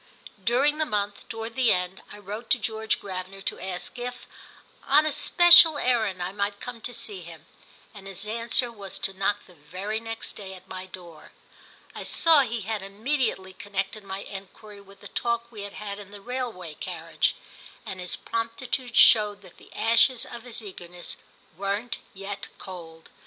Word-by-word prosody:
During 275 Hz, +7 st, +3 dB
the 310 Hz, -, +3 dB
month, 205 Hz, -5 st, -2 dB
toward 225 Hz, 0 st, -5 dB
the 255 Hz, -3 st, +5 dB
end, 180 Hz, +1 st, 0 dB
I 210 Hz, -, -9 dB
wrote 210 Hz, +3 st, -7 dB
to -, -, +5 dB
George 220 Hz, 0 st, -1 dB
Gravener 190 Hz, 0 st, -6 dB
to -, -, -2 dB
ask 190 Hz, +5 st, -3 dB
if, 245 Hz, 0 st, -5 dB, 0.6 s
on 295 Hz, +3 st, +6 dB
a 310 Hz, -, +2 dB
special 345 Hz, 0 st, +8 dB
errand, 220 Hz, -9 st, +1 dB
I 180 Hz, -, -2 dB
might 200 Hz, 0 st, -1 dB
come 245 Hz, -2 st, -7 dB
to 245 Hz, -, -3 dB
see 220 Hz, -5 st, -5 dB
him, 165 Hz, -3 st, -11 dB, 0.5 s
and 200 Hz, -2 st, -10 dB
his 195 Hz, +1 st, -4 dB
answer 230 Hz, +2 st, +1 dB
was 200 Hz, -4 st, -7 dB
to 195 Hz, -, -2 dB
knock 195 Hz, +2 st, 0 dB
the 180 Hz, -, -17 dB
very 185 Hz, +8 st, -4 dB
next 225 Hz, 0 st, -4 dB
day 190 Hz, -2 st, -8 dB
at 185 Hz, 0 st, -15 dB
my 185 Hz, 0 st, -7 dB
door. 175 Hz, -4 st, -12 dB, 0.6 s
I -, -, -6 dB
saw 325 Hz, -2 st, +6 dB
he 235 Hz, -4 st, +1 dB
had 215 Hz, 0 st, -2 dB
immediately 205 Hz, -1 st, -1 dB
connected 200 Hz, +2 st, -3 dB
my 195 Hz, 0 st, -5 dB
enquiry 200 Hz, +1 st, -10 dB
with 195 Hz, 0 st, -17 dB
the -, -, -8 dB
talk 235 Hz, 0 st, -1 dB
we 215 Hz, -3 st, -8 dB
had 200 Hz, 0 st, -6 dB
had 205 Hz, -1 st, -5 dB
in 200 Hz, -1 st, -10 dB
the 205 Hz, 0 st, -10 dB
railway 225 Hz, -8 st, -4 dB
carriage, -, -, -1 dB, 0.5 s
and 185 Hz, -, -5 dB
his 180 Hz, 0 st, 0 dB
promptitude 235 Hz, +2 st, -2 dB
showed 210 Hz, -2 st, +6 dB
that 180 Hz, -2 st, -15 dB
the -, -, -17 dB
ashes 230 Hz, +2 st, +4 dB
of 235 Hz, -, -8 dB
his 235 Hz, -2 st, -5 dB
eagerness 180 Hz, -3 st, -7 dB, 0.4 s
weren't 200 Hz, +5 st, -2 dB, 0.2 s
yet 195 Hz, +1 st, -5 dB
cold. 165 Hz, -4 st, -10 dB
205 Hz, 175 wpm, -27 LUFS, 190-235 Hz, 0.6 s, special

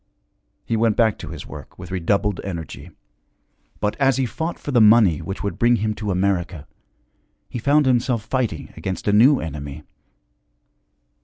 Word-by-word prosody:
He 115 Hz, -, -1 dB
went 110 Hz, -1 st, +2 dB
back 110 Hz, -3 st, +2 dB
to -, -, -7 dB
his -, -, -8 dB
work -, -, -11 dB
with 90 Hz, 0 st, -10 dB
redoubled 100 Hz, +2 st, 0 dB
energy. 85 Hz, -6 st, -7 dB, 0.9 s
But 105 Hz, -, -1 dB
as 135 Hz, -3 st, +3 dB
he 135 Hz, -, +1 dB
fought 160 Hz, +8 st, -4 dB
for 145 Hz, -, -6 dB
the 120 Hz, -3 st, +4 dB
money 105 Hz, -7 st, +5 dB
which 95 Hz, +1 st, -6 dB
would 100 Hz, -4 st, -3 dB
bring 120 Hz, +1 st, +4 dB
him 110 Hz, 0 st, -1 dB
to 105 Hz, 0 st, -5 dB
America, 90 Hz, -4 st, -1 dB, 0.8 s
he 120 Hz, -, -5 dB
found 145 Hz, +5 st, +3 dB
himself 125 Hz, -3 st, +1 dB
fighting 115 Hz, -, -2 dB
against 95 Hz, +2 st, -5 dB
a 105 Hz, -, +3 dB
new 130 Hz, +7 st, +6 dB
enemy. 75 Hz, -1 st, -6 dB
105 Hz, 160 wpm, -22 LUFS, 90-120 Hz, 0.9 s, new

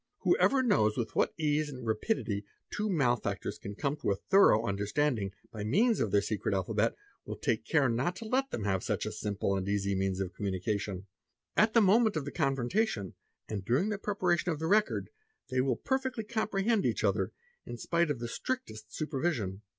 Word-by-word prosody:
Who -, -, +4 dB
ever 270 Hz, -1 st, +3 dB
knows 110 Hz, -, +3 dB
with 115 Hz, -3 st, -3 dB
what -, -, +2 dB
ease 150 Hz, -1 st, +1 dB
and 130 Hz, -4 st, -8 dB
rapidity 110 Hz, -, -1 dB, 0.3 s
two 210 Hz, 0 st, -1 dB
malefactors 125 Hz, -, 0 dB
can 100 Hz, -, -7 dB
come 140 Hz, +6 st, -1 dB
to: 100 Hz, -8 st, 0 dB, 0.2 s
thorough 155 Hz, -, +6 dB
understanding 105 Hz, +1 st, 0 dB, 0.2 s
by 105 Hz, -2 st, -5 dB
means 210 Hz, -, +3 dB
of 110 Hz, -, +1 dB
their 100 Hz, +1 st, +3 dB
secret 105 Hz, -1 st, -1 dB
alphabet 95 Hz, -2 st, 0 dB, 0.3 s
will -, -, -6 dB
take 110 Hz, -1 st, -2 dB
car 145 Hz, -4 st, +4 dB
not 130 Hz, +10 st, 0 dB
to 225 Hz, -, -8 dB
let 265 Hz, +4 st, +1 dB
them 110 Hz, -, -4 dB
have 95 Hz, -2 st, 0 dB
such -, -, -1 dB
a -, -, -3 dB
simple 100 Hz, -1 st, -1 dB
and 95 Hz, 0 st, -2 dB
easy 100 Hz, -1 st, 0 dB
means 95 Hz, 0 st, 0 dB
of 95 Hz, -2 st, -3 dB
communicatior 100 Hz, 0 st, -2 dB, 0.5 s
at 220 Hz, +2 st, +3 dB
the 230 Hz, -, +7 dB
moment 215 Hz, +1 st, +4 dB
of 155 Hz, -3 st, -2 dB
the 145 Hz, -, -5 dB
confrontation 135 Hz, -, 0 dB, 0.3 s
and 105 Hz, -3 st, -4 dB
during 135 Hz, -, +1 dB
the 205 Hz, -2 st, -2 dB
preparation 180 Hz, -4 st, 0 dB
of 160 Hz, -, -2 dB
th 160 Hz, +2 st, -2 dB
record, 210 Hz, +3 st, +2 dB, 0.4 s
they 130 Hz, 0 st, +1 dB
will 130 Hz, -2 st, +1 dB
perfectly 260 Hz, -, -2 dB
comprehend 215 Hz, -1 st, 0 dB
each -, -, 0 dB
other, -, -, +1 dB, 0.4 s
in 120 Hz, -, -6 dB
spite 170 Hz, +6 st, +1 dB
of 145 Hz, -, 0 dB
the 120 Hz, -, -5 dB
stx 115 Hz, -, -7 dB
ict 260 Hz, 0 st, -8 dB
est 110 Hz, 0 st, -12 dB
supervision. 135 Hz, -, -2 dB
130 Hz, 195 wpm, -31 LUFS, -, 0.5 s, the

